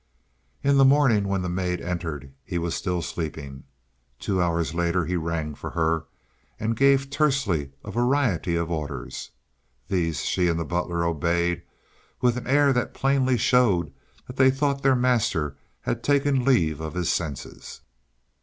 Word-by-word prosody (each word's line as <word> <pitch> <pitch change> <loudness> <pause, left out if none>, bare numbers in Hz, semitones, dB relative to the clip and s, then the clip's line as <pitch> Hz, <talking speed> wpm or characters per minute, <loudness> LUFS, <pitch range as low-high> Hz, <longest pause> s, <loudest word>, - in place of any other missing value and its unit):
In 140 0 +3
the 135 - +6
morning 135 -7 +4
when 95 -1 -1
the - - -2
maid 90 0 -1
entered 80 -6 -5
he 90 - -4
was 85 0 -2
still 90 -3 -2
sleeping. 70 -6 -6 0.5
Two 95 +7 -1
hours 85 -1 0
later 85 0 0
he 90 - -2
rang 80 -2 -2
for - - -7
her, 80 -1 0 0.5
and 110 +1 -1
gave 135 +2 +3
tersely 135 - +1
a - - -7
variety 120 - +1
of 85 0 -1
orders. 75 -3 -5 0.6
These 85 -5 0
she 90 -1 +1
and 85 -1 0
the 85 - -2
butler 85 +1 -1
obeyed 85 +1 0 0.6
with 125 -1 +2
an 125 - -5
air 140 +1 +4
that 125 -1 -1
plainly 130 -2 +2
showed 105 -8 +2 0.3
they 130 +1 +4
thought 140 +1 0
their 135 -1 +4
master 115 - +1 0.3
had 120 - -2
taken 140 -2 +2
leave 80 - +2
of 80 +2 -5
his 90 -2 0
senses. 75 -7 -5
90 Hz, 155 wpm, -25 LUFS, 85-130 Hz, 0.6 s, the